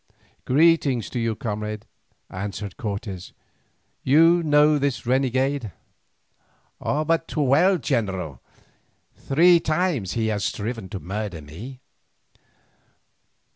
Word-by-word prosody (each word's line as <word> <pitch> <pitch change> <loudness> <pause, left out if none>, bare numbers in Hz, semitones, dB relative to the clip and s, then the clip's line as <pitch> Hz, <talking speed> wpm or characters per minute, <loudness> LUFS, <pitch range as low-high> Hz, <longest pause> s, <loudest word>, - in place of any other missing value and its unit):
"Greeting 145 -3 +3
to 120 - -5
you, 115 -1 -1
comrade," 105 -1 -4 0.5
answered 100 0 -5
Cortes. 100 -3 -5 0.7
"You 165 +5 +5
know 150 -1 +4
this 140 -2 -1
renegade?" 130 -1 0 1.1
"But 160 +2 0
too 150 - -1
well, 165 +8 +4
general. 95 - -2 0.7
Three 170 +5 +4
times 155 - -1
he 115 -1 -1
has 105 -2 -1
striven 110 -2 -3
to 100 - -5
murder 95 -1 -5
me." 110 - -10
125 Hz, 95 wpm, -23 LUFS, 105-150 Hz, 1.1 s, You